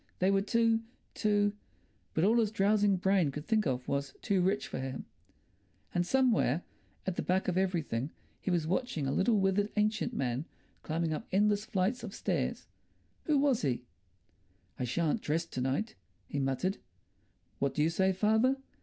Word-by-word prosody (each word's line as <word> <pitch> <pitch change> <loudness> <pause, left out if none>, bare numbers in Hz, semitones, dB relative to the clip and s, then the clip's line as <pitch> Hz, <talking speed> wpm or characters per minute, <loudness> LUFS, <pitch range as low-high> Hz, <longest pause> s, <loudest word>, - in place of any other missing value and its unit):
They 185 +2 +3
were 195 0 +3
too... 230 +1 +2 0.3
too.... 205 -1 +2 0.6
But 160 - +2
all 225 +5 +4
his 220 -2 +2
drowsing 205 -1 +3
brain 190 -3 +2
could 150 +2 -6
think 220 -4 +2
of 125 -1 -2
was—too 140 +7 -1
rich 195 +3 +1
for - - -5
him. 130 0 -5 0.9
And 175 0 +1
somewhere 230 - +2 0.4
at 190 -2 -2
the - - +1
back 185 +1 0
of 180 - 0
everything 165 -9 0 0.3
he - - -4
was 175 -3 +1
watching 185 - -1
a 135 - 0
little 210 - +3
withered 195 +2 +1
ancient 215 +2 +1
man 130 - -2 0.4
climbing 160 0 -1
up - - -5
endless 205 +2 +2
flights 205 +5 0
of - - -6
stairs. - - -1 0.6
Who 305 -2 +3
was 275 -4 +3
he? 125 -4 -1 1.0
"I 125 - 0
shan't 165 - 0
dress 160 +3 0
to 130 - -5
night," 140 - -1 0.3
he 140 - -3
muttered. 135 +9 -1 0.8
"What 140 0 0
do 150 - +2
you 160 - +2
say, 190 +3 +2
father?" 220 +7 +3
190 Hz, 165 wpm, -31 LUFS, 155-215 Hz, 1.0 s, all